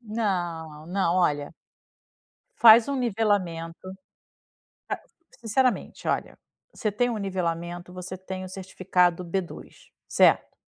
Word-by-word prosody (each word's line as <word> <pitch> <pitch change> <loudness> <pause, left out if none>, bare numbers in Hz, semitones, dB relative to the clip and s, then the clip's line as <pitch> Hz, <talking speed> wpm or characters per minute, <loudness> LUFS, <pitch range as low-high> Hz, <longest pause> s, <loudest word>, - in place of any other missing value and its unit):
Não, 175 -9 -3
não, 180 -1 0
olha 145 -3 0 1.0
Faz 230 - +8
um 280 - -1
nivelamento 200 -8 -1 1.5
ca - - -22
sinceramente, 245 +3 0
olha, - - -2 0.3
você 215 - -2
tem 245 +4 +1
um 225 - -2
nivelamento, 175 -2 -3
você 185 +1 -7
tem 190 0 -7
o - - -7
certificado 180 -1 0
B2, 175 +1 -4 0.4
certo? - - +3
185 Hz, 105 wpm, -26 LUFS, 170-215 Hz, 1.5 s, Faz